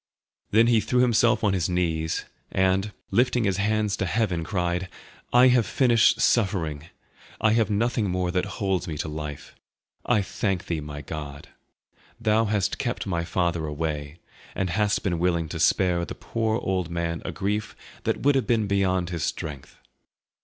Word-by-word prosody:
Then 110 +3 +5
he 115 -1 +4
threw 125 +3 +1
himself 120 -2 +3
on 105 -2 +3
his 90 -4 0
knees, 80 -3 -1 0.3
and, 95 +2 +1 0.2
lifting 125 0 +2
his 95 -3 +1
hands 105 0 +1
to 95 - -1
heaven, 95 -5 0
cried, 90 0 -2 0.4
"I 125 +1 +7
have 125 -3 +3
finished 120 -4 +4
suffering; 85 -9 +1 0.5
I 110 - +3
have 115 -1 +2
nothing 110 0 0
more 90 0 -1
that 90 0 0
holds 95 -3 -1
me 80 -2 -4
to - - -3
life. 75 -2 -6 0.5
I 110 -5 +2
thank 95 -2 -2
Thee, 80 -3 -2
my 75 0 -7
God! 70 -1 -7 0.7
Thou 110 0 +2
hast 105 -2 0
kept - - -2
my 85 -3 -1
father 85 -2 -1
away, 75 0 -4 0.4
and 95 -2 -1
hast 105 +2 +1
been 85 -4 -1
willing 85 -2 +1
to - - -5
spare 90 -2 +2
the - - -6
poor 110 -1 -1
old 95 -6 -2
man 85 0 -2
a - - -4
grief 105 +2 -2 0.3
that - - -1
would 145 +1 +4
have 135 -2 0
been 115 -3 +2
beyond 95 -3 +1
his 85 -2 -3
strength." 70 -3 -5
95 Hz, 165 wpm, -25 LUFS, 85-110 Hz, 0.7 s, I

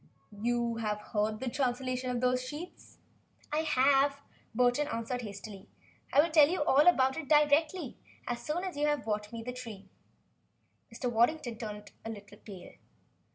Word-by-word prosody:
"You 235 0 0
have 210 -2 -2
heard 215 0 -2
the 265 - -4
translation 255 0 -1
of 245 -1 -1
those 250 0 +2
sheets?" 300 +7 -9 0.6
"I 305 - +2
have," 280 -1 +3 0.4
Burton 250 +4 +3
answered 230 0 -3
hastily. 200 -2 -9 0.4
"I 285 - +6
will 335 - -2
tell 305 -2 +7
you 355 -3 0
all 295 +2 +4
about 265 -6 +4
it 320 -4 -6
directly 300 +1 +3 0.3
as 240 -1 -4
soon 315 +7 -2
as 370 -4 -4
you 295 +1 +1
have 295 -2 0
brought 210 -1 -3
me 230 -1 -6
the 250 +2 -5
tree." 220 -6 -9 1.0
Mr. 230 +2 -4
Waddington 240 +3 +2
had 220 - -15
turned 210 -2 -7
a 225 - -5
little 205 -1 -10
pale. 190 -4 -11
250 Hz, 165 wpm, -31 LUFS, 225-290 Hz, 1.0 s, tell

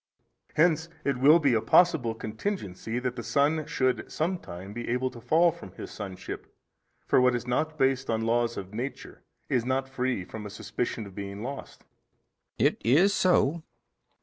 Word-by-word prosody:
A. - - -38
Hence 160 0 +3 0.2
it 140 -2 +1
will 145 +6 +7
be 145 -6 +2
a 110 - +2
possible 125 -2 +4
contingency 110 - -4
that 125 0 -2
the 120 - -4
son 145 +7 +1
should 130 -1 0
some 175 +3 -1
time 95 - -9
be 120 +1 -5
able 125 +2 0
to 120 - -11
fall 165 +8 +4
from 170 +1 -12
his - - -8
sonship: 95 -3 -7 0.5
for - - +4
what 125 -1 +4
is 120 - -3
not 155 +6 -1
based 135 -1 +1
on 110 -1 +1
laws 120 0 +1
of 95 +1 -7
nature 125 +5 -6 0.3
is 125 -3 +1
not 130 +2 0
free 130 -6 -1
from 110 +2 -8
a 105 - -6
suspicion 115 +2 -4
of 100 - -11
being 100 +1 -6
lost. 135 +3 -7 0.7
B. - - +2
It - - +2
is 165 - +5
so. 170 -4 +3
125 Hz, 180 wpm, -28 LUFS, 115-150 Hz, 0.7 s, will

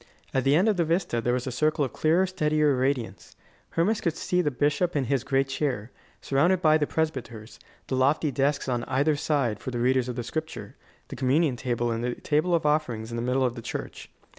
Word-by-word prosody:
At 130 -1 0
the 140 +1 +4
end 185 +7 +3
of 210 -3 +2
the 170 - +3
vista 165 -7 0
there 120 - 0
was 125 - -3
a 130 - -3
circle 155 +3 +1
of 125 - -7
clearer, 165 +4 +2
steadier 150 -5 +1
radiance. 130 -2 -2 0.4
Hermas 210 +6 +1
could 170 -5 -1
see 180 0 0
the 150 - +1
bishop 145 +6 0
in 140 - +1
his 130 0 0
great 135 0 +1
chair, 130 -4 -2 0.3
surrounded 170 +7 +2
by 155 -2 +4
the 150 - 0
presbyters, 125 -8 -4 0.3
the 130 - -2
lofty 140 +3 +2
desks 140 +2 0
on 120 -2 -1
either 140 +4 +1
side 140 -8 0
for - - -6
the 125 - -4
readers 125 +1 +1
of 125 - -4
the 120 - -3
Scripture, 155 +6 -6 0.3
the - - -6
communion 135 +2 +2
table 120 -1 -1
and 115 +1 -2
the 125 0 -2
table 155 +4 +1
of 165 - -1
offerings 125 -7 0
in - - -4
the 115 - -2
middle 130 +2 +1
of 125 - 0
the 120 - -8
church. - - -6
140 Hz, 220 wpm, -26 LUFS, 125-155 Hz, 0.4 s, the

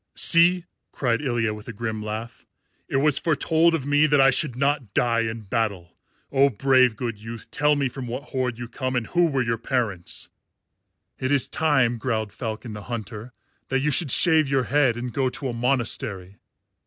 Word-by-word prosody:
"See!" 170 +1 +5 0.3
cried 120 -2 -1
Ilya 120 -6 0
with 105 -1 -11
a 115 - -6
grim 110 0 -4
laugh. 110 +2 -7 0.4
"It - - -3
was 140 +1 +3
foretold 165 +1 +2
of 140 -5 -4
me 145 +2 +3
that 145 -1 +3
I 135 0 +6
should 130 -1 -1
not 135 -5 -1
die 115 -1 +2
in 115 0 -2
battle. 100 -5 -3 0.4
Oh, 140 0 +4
brave 130 0 +3
good 115 -4 -5
youth, 115 +1 -9
tell 150 0 +2
me 140 -2 0
from 125 0 -7
what 125 +5 -6
horde 125 -3 -2
you 120 0 -6
come 130 +2 -4
and 120 -2 0
who 175 +6 +2
were 135 -5 0
your 115 -1 -2
parents." 115 -9 -3 0.9
"It 130 +1 -1
is 140 -4 +2
time," 135 -7 +1
growled 110 -4 -2
Falcon 110 -1 -6
the 105 -1 -9
Hunter, 115 0 -6 0.4
"that 135 0 0
you 150 +2 +1
should 145 +2 +2
shave 160 +2 +4
your 135 -2 +2
head 135 -4 +2
and 120 -1 -5
go 135 -2 +1
to 135 +1 -5
a - - -4
monastery." 115 -6 -1
125 Hz, 190 wpm, -24 LUFS, 115-140 Hz, 0.9 s, I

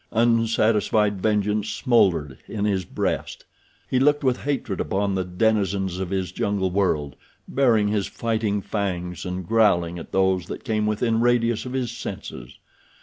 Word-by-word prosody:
Unsatisfied 110 -3 +2
vengeance 105 0 +1
smoldered 85 - +2
in 105 -1 -2
his 95 -3 0
breast. - - -3 0.4
He 130 - +1
looked 145 +2 +3
with 130 -2 +2
hatred 135 -9 -2
upon 100 0 -1
the 95 -1 0
denizens 95 -1 0
of 95 -2 -3
his 95 -2 -2
jungle 95 -1 -1
world, 75 -8 0 0.3
baring 115 -6 +3
his 105 -2 0
fighting 110 -3 -1
fangs 90 -4 -3
and 90 -1 -4
growling 90 -6 +2
at - - -10
those 95 -2 +1
that - - -7
came 110 -3 0
within 115 +2 +1
radius 120 -1 +2
of 125 - -6
his 130 -3 -1
senses. - - -7
105 Hz, 145 wpm, -24 LUFS, 95-115 Hz, 0.4 s, looked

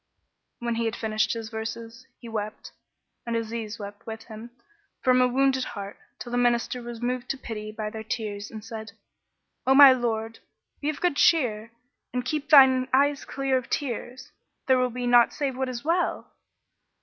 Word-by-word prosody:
When 240 -1 -2
he 230 0 -1
had 225 0 -1
finished 215 -1 0
his 225 -1 -6
verses, 230 +2 -7
he 235 - -12
wept 215 -2 -5 0.5
(and 235 -1 -3
Aziz 225 -1 -4
wept 205 0 -10
with 225 0 -6
him) 220 +1 -10 0.5
from 255 -1 +4
a 250 - +5
wounded 265 +1 +2
heart, 200 -3 -7 0.2
till 240 - -8
the 245 - +1
Minister 245 0 +1
was 235 -1 -7
moved 250 0 -2
to 270 - -1
pity 215 -4 -6
by 215 0 -5
their 220 0 -6
tears 210 -2 -4
and 220 -1 -9
said, 220 -2 -8 0.7
"O 265 - +5
my 275 -1 +10
lord, 225 -2 -2 0.4
be 295 - -1
of 305 - -4
good 355 -5 +1
cheer 230 -10 +2 0.4
and 250 0 -1
keep 300 +2 -3
thine 260 -3 +7
eyes 285 +2 +2
clear 270 -1 0
of 255 - -13
tears; 255 -1 -4 0.3
there 260 -1 +4
will 255 0 +2
be 245 +1 -4
naught 240 -1 +5
save 275 -3 -2
what 260 0 -2
is 245 +1 -6
well!" 345 +3 0
240 Hz, 180 wpm, -26 LUFS, 220-260 Hz, 0.7 s, my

